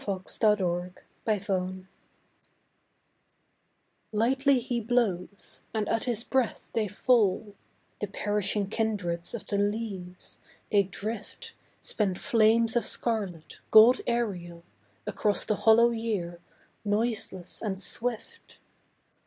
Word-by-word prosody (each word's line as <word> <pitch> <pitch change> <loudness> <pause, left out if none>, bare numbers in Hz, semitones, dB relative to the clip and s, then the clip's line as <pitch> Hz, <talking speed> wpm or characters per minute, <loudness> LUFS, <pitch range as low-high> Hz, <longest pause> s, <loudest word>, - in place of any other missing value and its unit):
The 205 +2 +1
Falling 180 -1 -2 0.3
Leaves 185 -3 -1 2.2
Lightly 260 +5 +3
He 245 -1 -2
blows, 210 -5 -1
and 215 -1 0
at 225 - 0
His 235 -3 0
breath 260 -3 -1
they 220 -2 +1
fall, 210 -1 +2 0.5
The 210 - -2
perishing 205 0 -1
kindreds 200 -6 -2
of 235 - -7
the 200 - -1
leaves; 205 -4 -3 0.3
they 205 - +5
drift, 215 - -6 0.3
Spent 195 -4 0
flames 225 +1 +3
of 240 - +3
scarlet, 200 -9 -1
gold 225 +4 +8
aerial, 180 -8 -2 0.4
Across 205 0 +1
the 215 - +1
hollow 230 +2 +5
year, 205 -7 -3 0.4
noiseless 210 -3 -2
and 195 -4 -3
swift. 235 +3 -4
210 Hz, 105 wpm, -28 LUFS, 190-230 Hz, 2.2 s, gold